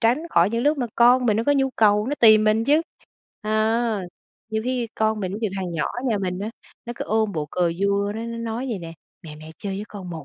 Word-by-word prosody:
tránh 235 +3 +3
khỏi 170 +3 +3
những 230 +1 -1
lúc 295 0 +2
mà 245 - -1
con 245 +1 +5
mình 215 -3 +3
nó 225 - 0
có 290 - +3
nhu 270 -2 +1
cầu, 210 0 +3
nó 290 - -1
tìm 215 -2 +7
mình 215 +1 +2
chứ! 300 +3 +3 0.6
À, 220 +1 +1 0.5
nhiều 220 0 -1
khi 250 -2 -1
con 220 0 0
mình 185 -1 -3
ví - - -4
dụ 215 - +1
thằng 185 -2 -4
nhỏ 155 -3 -1
ở 245 - -4
nhà 220 -3 +1
mình 180 -2 -3
á, 205 +3 -4 0.4
nó 240 - -4
cứ - - -4
ôm 220 -1 0
bộ 155 -4 -3
cờ 175 -2 0
vua, 200 +1 +1
nó 225 - -4
nó 230 0 -5
nói 230 +2 -4
vậy 210 - -2
nè: 165 -1 -8 0.3
"Mẹ, 155 -3 -10
mẹ 155 +1 -11
chơi 195 -2 -4
với 205 - -5
con 190 -4 -8
1 160 -3 -7
215 Hz, 265 wpm, -23 LUFS, 195-235 Hz, 0.6 s, tìm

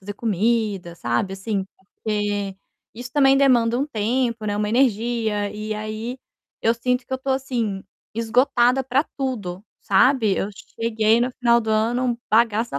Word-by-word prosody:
fazer 205 +1 -7
comida, 210 -4 0
sabe, 120 +11 -1
assim. 195 0 -2
Porque 205 0 -3 0.4
isso 245 +1 -8
também 275 -2 +5
demanda 245 -3 +3
um 280 - 0
tempo, 230 -1 -1
né, 205 -1 -1
uma 210 0 -1
energia, 225 -3 +1
e 215 +1 -4
aí 215 +4 -5 0.4
eu 230 - +2
sinto 250 +2 -1
que - - -9
eu 260 - 0
tô, 270 +1 -4
assim, 240 -7 -2 0.3
esgotada 245 +2 +2
para 265 +3 +1
tudo, 210 -9 -4 0.2
sabe. 220 0 +3
Eu 200 - -1 0.3
cheguei 225 0 +3
no 245 +2 +1
final 235 -1 +4
do 220 -1 -3
ano 230 +4 +1
um 240 -2 0
bagaço 225 +1 +2
da 140 - -1
225 Hz, 160 wpm, -22 LUFS, 210-250 Hz, 0.4 s, também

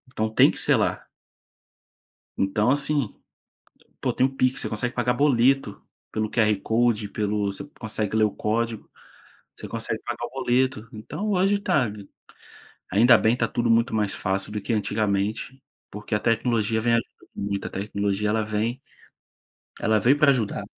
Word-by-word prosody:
Então 110 0 0
tem 110 - +5
que - - -5
ser - - +3
lá. - - -1 1.3
Então 105 +4 +1
assim, 145 -4 +1 0.9
pô - - 0
tem 130 - +2
o - - -3
PIX, 130 0 +1
você - - -1
consegue 120 +3 -3
pagar 125 0 +1
boleto, 130 -4 +2 0.3
pelo 110 -1 -2
QR 110 -2 +3
Code, 110 -1 +1
pelo 105 0 -1
você 95 - -8
consegue 110 -1 -3
ler 110 - +4
o 105 - +2
código, 115 +2 -2 0.6
você - - -9
consegue - - -3
pagar - - -4
o - - -12
boleto, 125 -2 0
então 155 - -5
hoje 195 +1 +2
tá 140 - +1 1.0
ainda 115 +4 +6
bem 110 +2 +2
tá - - 0
tudo 120 -1 -1
muito 115 +1 +3
mais 105 -3 0
fácil 95 +1 -2
do 105 0 -4
que 110 - -4
antigamente, 105 +4 -1 0.3
porque 105 +1 -4
a - - +1
tecnologia 115 -1 +1
vem 120 0 +2
ajudando 115 - -3
muito, 100 0 -3
a - - -6
tecnologia 100 +1 -2
ela 110 +1 +1
vem 110 +5 -2 1.0
ela 110 -1 +3
veio 130 +7 +4
pra 150 - +5
ajudar. 125 -7 0
110 Hz, 160 wpm, -24 LUFS, 105-125 Hz, 1.3 s, ainda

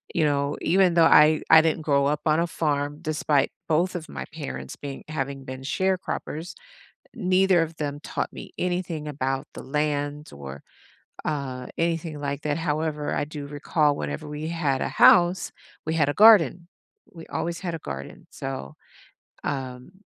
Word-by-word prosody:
you 165 - +3
know, 140 0 0
even 185 +1 +3
though 170 - +6
I 155 0 +6
I 160 - +10
didn't 160 0 0
grow 140 -2 +2
up 150 0 0
on 155 0 +3
a 170 - +1
farm 145 -2 -1
despite 150 -3 +1 0.2
both 170 +4 +2
of 165 -2 -5
my 65 - -5
parents 65 0 -6
being 140 -2 -7
having 135 -2 -4
been 130 0 -7
sharecroppers, 175 +1 -2 0.6
neither 185 -3 +3
of 165 0 -4
them 145 -1 -4
taught - - -3
me - - -10
anything 175 -4 -2
about 135 -2 -2
the - - -7
land 150 0 -2
or, 70 -1 -9 0.6
uh, 135 -4 -3
anything 165 -2 -1
like 140 0 -3
that, 150 -1 0
however, 155 -2 -1
I - - 0
do 145 -1 -7
recall 145 0 +1
whenever 155 +1 -5
we 150 +1 -5
had 150 -6 0
a - - 0
house, 175 +1 +5 0.3
we 160 +1 -1
had 150 -3 +3
a - - 0
garden. 185 - +6 0.5
We 165 -2 -10
always 170 0 -3
had 175 -3 -3
a - - -6
garden, 70 - -8
so, 135 - -6 0.7
um 130 +1 -4
150 Hz, 165 wpm, -25 LUFS, 140-165 Hz, 0.7 s, I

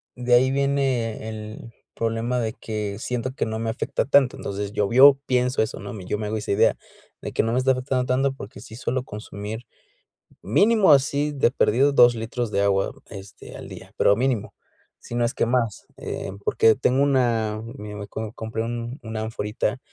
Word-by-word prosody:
de 125 0 +2
ahí 130 +2 +4
viene 135 -5 0
el 110 +1 -8 0.2
problema 115 +2 -1
de 110 -2 -2
que 105 -3 -5
siento 125 +2 -3
que 130 - -2
no 110 0 -3
me 115 0 -2
afecta 115 - -2
tanto, 135 -2 +3
entonces 100 +1 -5
llovió, 130 +8 +6
pienso 125 -1 +1
eso, 110 - -5
¿no? 100 +1 -7
Yo 95 +3 -3
me 105 - -3
hago 110 +1 -2
esa 105 - -4
idea, 100 - +3 0.4
de - - -5
que - - +1
no 115 - -1
me - - +1
está 130 +1 +3
afectando 130 0 -1
tanto 135 +2 +1
porque 115 -6 -10
sí 110 +1 -11
suelo 125 +2 -2
consumir, 105 0 -7 0.8
mínimo 205 - +4
así 140 +2 +1
de 135 -4 +2
perdido, 135 +2 +3
dos 120 -3 +6
litros 115 +1 -3
de 100 - +1
agua 100 -1 +1 0.2
este, 100 -1 -11
al - - -9
día, - - -11
pero 100 - +4
mínimo. 125 -3 -1 0.4
Si - - -10
no 120 0 +1
es 115 - -3
que - - +1
más, 115 -3 -1
eh, - - -5
porque 110 +2 +4
tengo 130 +1 +2
una, 120 -6 +1 0.2
mira 105 -4 -8
me 100 0 -7
co 110 +1 -5
compré 110 0 -4
un 120 +2 -4
una 110 0 -5
anforita 110 +1 -2
115 Hz, 190 wpm, -24 LUFS, 110-130 Hz, 0.8 s, llovió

